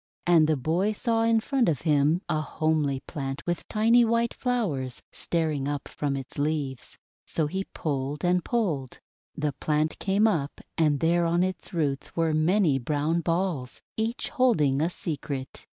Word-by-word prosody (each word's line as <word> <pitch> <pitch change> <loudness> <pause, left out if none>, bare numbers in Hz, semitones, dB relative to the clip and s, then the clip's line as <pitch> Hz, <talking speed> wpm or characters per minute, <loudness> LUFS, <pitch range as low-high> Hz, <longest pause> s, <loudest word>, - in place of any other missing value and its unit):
And 165 -3 +5
the 155 -1 +2
boy 170 +10 +1
saw 225 +1 0
in 225 0 +3
front 255 -4 +1
of 150 -6 -1
him 155 +2 +2
a 155 - 0
homely 155 -3 0
plant 135 -1 -5
with 175 0 -2
tiny 230 +3 +4
white 230 0 +1
flowers 175 - -2
staring 155 -5 -1
up 145 -1 -3
from 140 -2 -2
its 135 +1 -7
leaves. 145 -3 -2 0.3
So 160 - 0
he 190 +6 -3
pulled 145 +1 -3
and 180 0 +2
pulled. 165 - -1 0.4
The 150 -2 -1
plant 155 +3 -1
came 200 +3 +3
up, 155 -9 -1 0.2
and 150 -4 +2
there 170 +1 +3
on 170 +2 +2
its 185 -2 -3
roots 145 -5 -2
were 165 -1 +1
many 155 -2 +3
brown 150 +5 0
balls, 165 -7 -1 0.2
each 225 +2 -2
holding 160 - +2
a 165 - +2
secret. 145 -6 -5
160 Hz, 160 wpm, -27 LUFS, 145-190 Hz, 0.4 s, And